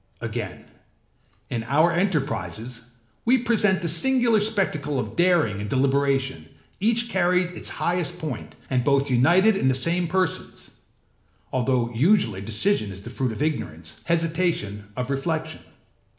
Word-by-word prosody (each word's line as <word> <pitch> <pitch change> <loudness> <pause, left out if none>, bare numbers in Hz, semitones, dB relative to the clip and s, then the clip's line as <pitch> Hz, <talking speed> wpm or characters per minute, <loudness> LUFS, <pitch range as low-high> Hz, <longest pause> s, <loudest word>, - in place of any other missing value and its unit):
Again, - - -5 0.9
in 115 - -1
our 155 +7 +3
enterprises 125 - -2 0.4
we 250 +3 +4
present 210 -6 +2
the - - 0
singular 235 +6 +3
spectacle 185 -10 0
of - - -4
daring 170 - +2
and 105 - -5
deliberation, 135 0 0 0.3
each 230 +3 +1
carried 180 -3 +1
to 180 - -12
its - - -3
highest 175 0 -1
point, 155 -8 -6
and 125 -2 0
both 140 0 +2
united 175 - +4
in 135 - +1
the 130 - +3
same 170 +6 0
persons; 185 +2 -2 0.8
although 125 -2 +1
usually 125 - +2
decision 110 - +1
is 95 +1 -10
the 120 - -8
fruit 130 -1 -2
of 110 +6 -3
ignorance, 80 - -4
hesitation 165 - -1
of 125 +2 -3
reflection. 155 +4 -2
155 Hz, 135 wpm, -24 LUFS, 125-180 Hz, 0.9 s, we